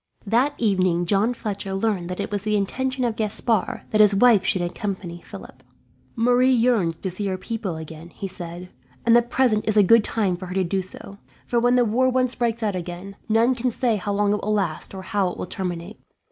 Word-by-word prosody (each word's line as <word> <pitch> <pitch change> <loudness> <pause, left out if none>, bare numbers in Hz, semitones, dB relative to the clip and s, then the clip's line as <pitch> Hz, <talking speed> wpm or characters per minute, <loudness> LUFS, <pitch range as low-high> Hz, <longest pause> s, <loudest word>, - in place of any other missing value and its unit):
That 250 +8 +2
evening 185 -5 +2
John 205 +6 +2
Fletcher 200 -3 -4
learned 195 -3 -1
that 180 - -5
it - - -3
was 205 -1 -1
the 210 +1 0
intention 255 +6 -2
of 235 -3 0
Gaspard 220 0 -1
that 215 - +4
his 205 -1 +5
wife 220 -2 +5
should 185 -5 0
accompany 175 -1 -5
Philip. - - -12 0.5
"Marie 245 +2 +3
yearns 225 -9 +2
to 190 - -4
see 200 +3 -3
her 190 -1 -2
people 205 -3 -4
again," 160 +1 -9
he 195 - -6
said, 180 0 -8 0.3
"and 235 0 +5
the 240 - +7
present 240 -3 +1
is 215 0 +1
a 205 - +7
good 230 +3 +6
time 200 -6 0
for 185 +1 -8
her 180 - -6
to 190 - +2
do 190 +2 -1
so; 195 +2 -10 0.3
for 240 - +1
when 245 +1 +3
the 245 -1 +4
war 250 +4 +2
once 255 -1 +1
breaks 235 -1 -1
out 205 -3 0
again, 180 +2 -6
none 225 +4 +4
can 250 0 -1
say 235 -2 0
how 205 +1 -3
long 205 0 +2
it 210 - -2
will 215 - -2
last 195 -3 -2
or 190 - -7
how 195 -1 0
it - - -8
will - - -4
terminate. 180 +1 -5
205 Hz, 220 wpm, -23 LUFS, 185-230 Hz, 0.5 s, the